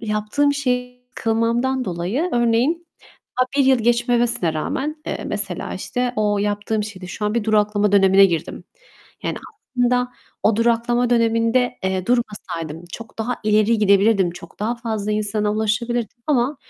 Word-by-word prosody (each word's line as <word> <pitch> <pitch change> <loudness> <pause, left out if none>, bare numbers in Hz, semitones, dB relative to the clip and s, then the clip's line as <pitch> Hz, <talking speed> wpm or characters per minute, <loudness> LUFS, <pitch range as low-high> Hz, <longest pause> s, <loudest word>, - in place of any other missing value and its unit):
yaptığım 215 +7 0
şeyi 250 -2 -2
kılmamdan 235 +3 0
dolayı 190 - -2
örneğin 240 +8 +1 0.5
daha 255 - +4
1 275 - +4
yıl 260 -2 +5
geçmemesine 235 -6 +1
rağmen, 300 - -3
eee, - - -4
mesela, 195 -4 -3
işte, 245 +6 -2
o 210 -1 +1
yaptığım 205 +1 -1
şeyde 190 -4 -8
şu 210 +4 -5
an 210 - -1
bir 235 - 0
duraklama 210 -1 +2
dönemine 195 0 +6
girdim. 170 -4 -4 0.6
Yani - - -2 0.4
aslında 250 0 +2 0.4
o 215 -1 +4
duraklama 235 +1 +2
döneminde, 230 +1 +2
eee, 190 -1 -1
durmasaydım 175 -9 -2
çok 225 -1 -10
daha 240 +3 -2
ileri 215 +1 +3
gidebilirdim. 200 -2 +4
Çok 170 +1 -13
daha 225 +3 0
fazla 220 -3 -3
insana 210 0 0
ulaşabilirdim 225 +2 -1
ama 275 0 +1
225 Hz, 140 wpm, -21 LUFS, 205-245 Hz, 0.6 s, dönemine